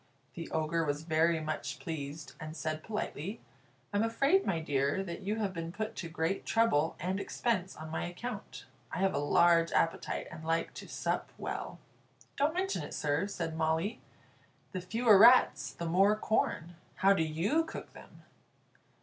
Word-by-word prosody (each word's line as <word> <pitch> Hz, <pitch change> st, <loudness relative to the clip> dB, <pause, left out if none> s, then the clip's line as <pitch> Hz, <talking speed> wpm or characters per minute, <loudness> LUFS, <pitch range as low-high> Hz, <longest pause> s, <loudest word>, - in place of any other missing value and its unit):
The 165 Hz, -1 st, -7 dB
Ogre 160 Hz, +1 st, 0 dB
was 145 Hz, 0 st, -2 dB
very 160 Hz, +1 st, +2 dB
much 155 Hz, -3 st, -4 dB
pleased, 155 Hz, -3 st, -6 dB
and 155 Hz, +1 st, -7 dB
said 155 Hz, -1 st, -3 dB
politely: 210 Hz, -3 st, -4 dB, 0.5 s
"I'm 205 Hz, -, +2 dB
afraid, 275 Hz, -, +2 dB
my 170 Hz, -, +1 dB
dear, 145 Hz, +3 st, 0 dB
that 170 Hz, -1 st, -6 dB
you 205 Hz, +2 st, -1 dB
have 205 Hz, -4 st, -2 dB
been 165 Hz, -1 st, -4 dB
put 215 Hz, +3 st, -4 dB
to 170 Hz, -, -4 dB
great 165 Hz, +3 st, -1 dB
trouble 195 Hz, -9 st, +2 dB
and 185 Hz, +2 st, -1 dB
expense 200 Hz, -3 st, -1 dB
on 155 Hz, 0 st, -8 dB
my -, -, -2 dB
account, 235 Hz, +8 st, -7 dB, 0.3 s
I -, -, -3 dB
have 190 Hz, +1 st, +2 dB
a 140 Hz, -, 0 dB
large 165 Hz, +3 st, +4 dB
appetite, 165 Hz, -, 0 dB
and 160 Hz, -, -9 dB
like 165 Hz, +1 st, 0 dB
to -, -, -9 dB
sup -, -, -2 dB
well." -, -, -5 dB, 0.6 s
"Don't 295 Hz, +4 st, +1 dB
mention 380 Hz, -, 0 dB
it, 145 Hz, -, -6 dB
sir," 145 Hz, +6 st, 0 dB
said 165 Hz, -5 st, -4 dB
Molly. 160 Hz, +8 st, 0 dB, 0.7 s
"The 185 Hz, -, -4 dB
fewer 215 Hz, +2 st, +4 dB
rats 245 Hz, +4 st, +6 dB
the 170 Hz, -, -6 dB
more 195 Hz, +5 st, +4 dB
corn. 175 Hz, -6 st, -1 dB, 0.2 s
How 195 Hz, +1 st, +5 dB
do 185 Hz, -, +1 dB
you 165 Hz, -, +1 dB
cook 320 Hz, -, -8 dB
them?" -, -, -15 dB
170 Hz, 165 wpm, -32 LUFS, 160-210 Hz, 0.7 s, rats